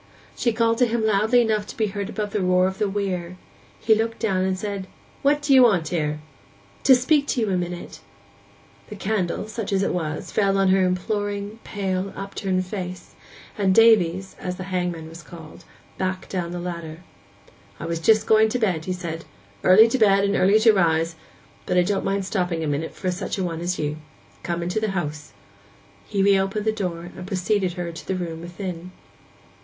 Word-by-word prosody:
She 240 - +1
called 230 0 +1
to 250 - +4
him 225 -1 0
loudly 220 +3 +3
enough 215 -2 0
to - - -9
be 220 - +2
heard 200 0 -4
above 210 -2 -3
the 210 - -1
roar 180 0 +3
of 190 0 -2
the 210 - +1
weir; 185 -3 -3 0.4
he 220 - +4
looked 225 +1 0
down 190 -4 0
and 190 0 0
said, 200 -1 -4 0.3
'What 290 +1 +2
d'ye 275 -2 +6
want 195 -11 +4
here?' 150 -3 -1 0.6
'To 260 - +7
speak 280 +3 +2
to 250 - 0
you 215 -3 0
a - - +1
minute.' 175 -1 -5 0.9
The 210 - -7
candle 195 -3 -1
light, 215 - -7
such 220 -3 -4
as 195 0 +2
it - - 0
was, 155 -3 -3
fell 195 -2 +2
upon 195 -1 +3
her 190 0 +4
imploring, 205 +3 -2
pale, 190 -1 -3
upturned 195 -1 -2
face, 185 -2 -6 0.4
and 195 -2 +2
Davies 190 -5 +4
(as 180 0 -4
the 185 - -6
hangman 175 -3 -2
was 165 +1 -10
called) 165 -3 -12 0.3
backed 185 0 -2
down 180 -3 -2
the 175 - -4
ladder. 170 -1 -6 0.8
'I - - -5
was 165 0 -2
just 215 +5 +4
going 220 0 +5
to 250 - -1
bed,' 185 -9 0
he 185 - -1
said; 165 -3 -6 0.4
'"Early 205 +5 +7
to 255 +3 -1
bed 200 -2 +5
and 200 0 +1
early 195 +4 +4
to 225 -1 +6
rise," 165 -3 +2 0.5
but 180 - +1
I 180 - +5
don't 195 +2 -1
mind 195 0 -1
stopping 180 -4 -1
a - - -2
minute 145 +2 -2
for 185 - -2
such 180 +3 -4
a 190 - -1
one 165 -2 -3
as 180 +1 -1
you. 150 0 -2 0.4
Come 170 0 -3
into 180 +5 -1
house.' 150 -6 -4 0.7
He 195 - 0
reopened 195 +1 +2
the 220 - +3
door, 180 -5 -4
and 180 - -8
preceded 190 -1 0
her 175 -1 -4
to 165 - -10
the 190 - -1
room 165 -3 -4
within. 175 0 -6
190 Hz, 195 wpm, -23 LUFS, 175-210 Hz, 0.9 s, To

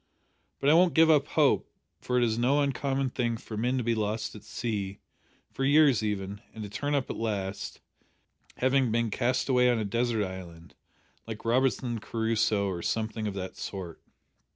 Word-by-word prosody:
But 140 - +3
I - - +6
won't 175 +1 +4
give 160 0 +6
up 145 -2 +3
hope, 150 -3 +2 0.3
for 125 - -1
it 125 - +4
is 115 -2 +1
no 135 +4 +3
uncommon 135 -1 0
thing 120 -2 -1
for 110 -1 -8
men 125 +4 0
to 125 - -1
be 120 +1 +1
lost 110 0 -2
at 105 - -11
sea, 100 -4 -3 0.5
for 135 - -4
years 140 -3 +5
even, 100 -1 -3
and 110 - -6
to 100 - -7
turn 145 +6 -1
up 135 -2 -1
at - - -5
last, 100 -3 -3 0.8
having 130 -2 +2
been 115 -1 0
cast 125 +3 0
away 125 -2 +4
on 120 - +2
a 110 - -1
desert 115 0 0
island, 90 -3 -9 0.5
like 110 0 -7
Robinson 120 0 +1
Crusoe, 110 -2 0
or 90 -3 -3
something 110 +1 -2
of 100 - -4
that 95 -1 -6
sort." 90 -4 -6
115 Hz, 180 wpm, -28 LUFS, 105-130 Hz, 0.8 s, I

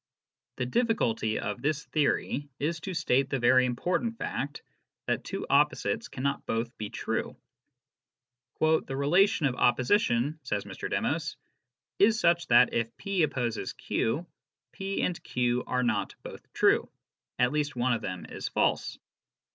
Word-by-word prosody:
The 125 - -2
difficulty 125 - +1
of 105 - -4
this 150 0 -1
theory 145 -1 0
is 160 +3 -1
to 185 +3 -5
state 135 -4 +2
the 135 - 0
very 125 +1 +4
important 180 - -1
fact 145 - -4 0.4
that - - -1
two - - -4
opposites - - +2
cannot 140 +2 -2
both 115 +1 -2
be 105 -1 -4
true. - - -3 1.2
"The 155 -4 +2
relation 175 +5 +3
of 135 - +2
opposition," 125 - +2
says 105 -6 -2
Mr. - - -6
Demos, - - -1 0.3
" - - -63
is 220 +2 +5
such 170 0 +3
that, 120 +1 +6
if 115 0 -2
p 195 -2 -1
opposes 125 -7 -1
q, 130 +10 -1 0.5
^>and 195 -2 -2
q 125 0 0
are 125 0 0
not 115 -4 0
both - - -11
true - - +3 0.5
(at 125 0 +3
least 150 -1 -1
one 125 +1 +1
of 115 - -1
them 90 -4 -5
is - - -5
false). - - 0
135 Hz, 145 wpm, -29 LUFS, 120-165 Hz, 1.2 s, that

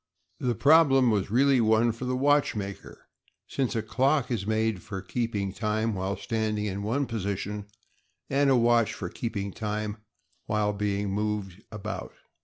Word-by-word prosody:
The 120 -2 0
problem 135 -2 +5
was 100 -2 0
really 130 +3 +4
one 110 +1 +4
for 115 +3 -6
the 125 0 0
watchmaker, 130 -8 0 0.4
since 130 -4 -2
a 110 - 0
clock 135 +5 +1
is 105 -4 -2
made 110 -3 0
for 100 -2 -6
keeping 100 0 -2
time 110 +2 -1
while 95 +1 -2
standing 110 -1 -1
in 100 -1 -3
one 120 +7 0
position 105 -2 -3 0.6
and 140 +1 +2
a 135 - +5
watch 120 -1 +3
for 90 - -5
keeping 100 -4 -4
time 105 0 -3 0.5
while 105 -1 +1
being 100 -1 -1
moved 105 -2 -2
about. 105 0 -6
110 Hz, 150 wpm, -27 LUFS, 100-120 Hz, 0.6 s, problem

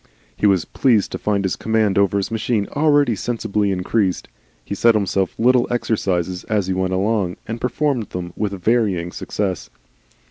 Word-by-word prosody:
He 105 - +2
was 95 -4 +2
pleased 115 -7 +2
to - - -4
find 100 -2 0
his 95 - 0
command 110 -3 +1
over 100 0 +3
his 100 - -2
machine 110 -2 0
already 145 -5 +3
sensibly 105 -1 -1
increased. 95 +1 -1 0.4
He - - -5
set 115 -1 +4
himself 95 -2 0
little 125 +1 +3
exercises 95 -7 -1
as 105 -3 0
he 95 - -1
went 95 0 -1
along 95 -2 0
and 115 +1 -5
performed 125 -3 -1
them 85 -1 -6
with 105 -1 -2
variable 95 -4 +1
success. 95 -3 -3
105 Hz, 165 wpm, -20 LUFS, 95-115 Hz, 0.4 s, set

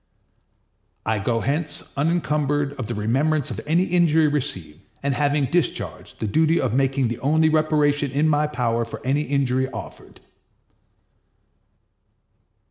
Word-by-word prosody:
I 110 -1 0
go 115 +3 0
hence 150 +3 -3
unencumbered 145 -2 0
of 120 - -3
the 120 - -3
remembrance 135 +8 0
of - - -5
any 170 +4 +3
injury 170 -4 +3
received, 110 - -3 0.2
and 140 0 +1
having 145 +1 +1
discharged 170 +4 -2
the - - -2
duty 160 +8 +2
of 125 -4 0
making 135 0 +1
the 120 +1 -4
only 155 +3 +3
reparation 150 -2 +2
in 145 +4 +1
my 150 0 +2
power 120 -4 -1
for 115 - -7
any 140 +3 +1
injury 130 -3 0
offered. - - -10
145 Hz, 130 wpm, -23 LUFS, 125-155 Hz, 0.2 s, any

